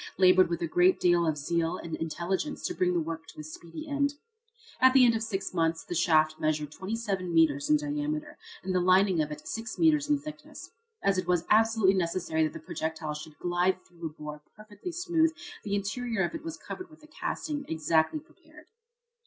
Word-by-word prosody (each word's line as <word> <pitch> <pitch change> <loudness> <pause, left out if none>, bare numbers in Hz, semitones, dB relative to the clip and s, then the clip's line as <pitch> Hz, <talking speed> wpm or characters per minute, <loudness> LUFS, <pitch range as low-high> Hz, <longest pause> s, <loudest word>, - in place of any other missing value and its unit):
labored 185 -1 +6
with 170 0 -2
a - - 0
great 180 +3 +4
deal 175 -1 +3
of 155 -1 0
zeal 165 +3 -1
and 165 - -7
intelligence 175 - -3
to - - -1
bring 180 -1 +1
the - - +3
work 165 0 -5
to - - -13
a - - -6
speedy 170 - -9
end. 285 0 0 0.6
At 260 0 +6
the 260 -2 +8
end 235 - +5
of 225 - -1
six 195 -4 -3
months 165 -1 0
the - - -6
shaft 155 -2 +3
measured 150 -1 -1
27 195 -1 -3
metres 155 -4 +3
in 150 - +6
diameter 150 +1 -3 0.2
and 190 0 -2
the 185 - +3
lining 185 -1 +4
of 150 0 -2
it 150 0 -8
6 225 0 -5
metres 300 -3 +3
in 295 - +4
thickness. 305 +1 -10 0.3
As 195 -1 +3
it 185 - -4
was 180 -2 +1
absolutely 220 -3 +5
necessary 170 -3 0
that 155 - -3
the - - -7
projectile 160 -1 -4
should 150 0 -9
glide 180 +1 0
through 170 -1 -7
a - - -5
bore 150 -1 -8
perfectly 215 - -8
smooth 330 -2 +1 0.3
the 200 -1 -1
interior 205 +1 -1
of 175 - -2
it 325 - -6
was 330 -1 -6
covered 370 -1 -8
with 310 -1 -18
a - - -14
casting 300 -1 -4
exactly 160 - +1
prepared. 315 0 -19
185 Hz, 200 wpm, -29 LUFS, 160-240 Hz, 0.6 s, the